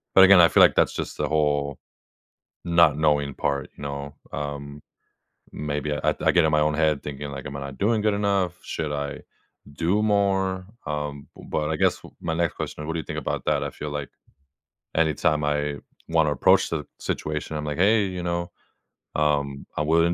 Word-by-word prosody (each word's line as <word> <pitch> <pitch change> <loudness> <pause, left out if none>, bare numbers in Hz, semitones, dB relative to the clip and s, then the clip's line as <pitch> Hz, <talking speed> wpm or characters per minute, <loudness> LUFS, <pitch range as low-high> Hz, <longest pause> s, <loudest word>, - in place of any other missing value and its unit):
But, 95 - +9
again, 95 -2 +8
I 85 - +8
feel - - +5
like - - +5
that's - - +3
just - - -5
the - - 0
whole 75 -2 0 0.9
not 85 -3 +4
knowing 75 -2 +2
part, 70 -2 -1
you - - -9
know? 70 0 -5 0.2
Um, 70 0 -5 0.7
maybe 75 0 -3
I - - +1
I - - +4
get 85 -2 +4
in 80 - +2
my 75 - +3
own 75 0 +2
head 75 -2 +2
thinking, 70 0 -6
like, 70 -1 -7
"Am 70 - -7
I 70 - -6
not 70 -1 -7
doing 110 +2 +2
good 105 0 +2
enough? 100 -3 +1
Should 80 -2 -3
I 70 0 -4 0.5
do 85 +8 +1
more?" 95 -3 +1 0.2
Um, 75 -1 -4
bu - - -13
but 75 -1 -1
I - - 0
guess - - +2 0.2
my 80 - -2
next 85 -2 0
question, 75 - -5
what 80 - -2
do 85 - -2
you 80 - -6
think - - -5
about - - -3
that? - - +1
I - - -2
feel 75 - -6
like 75 -1 -4 0.9
anytime 75 -1 +2
I 75 0 0 0.3
wanna 80 -2 +3
approach 70 - +4
the - - -2 0.2
situation, 75 0 -3
I'm 75 - -3
like, 75 0 -3
"Hey. 105 +2 +4
You 90 -1 -4
know, 85 0 -2 0.7
um, 70 -2 0
I'm 75 0 0
willing 85 +1 +4
75 Hz, 195 wpm, -25 LUFS, 70-85 Hz, 0.9 s, But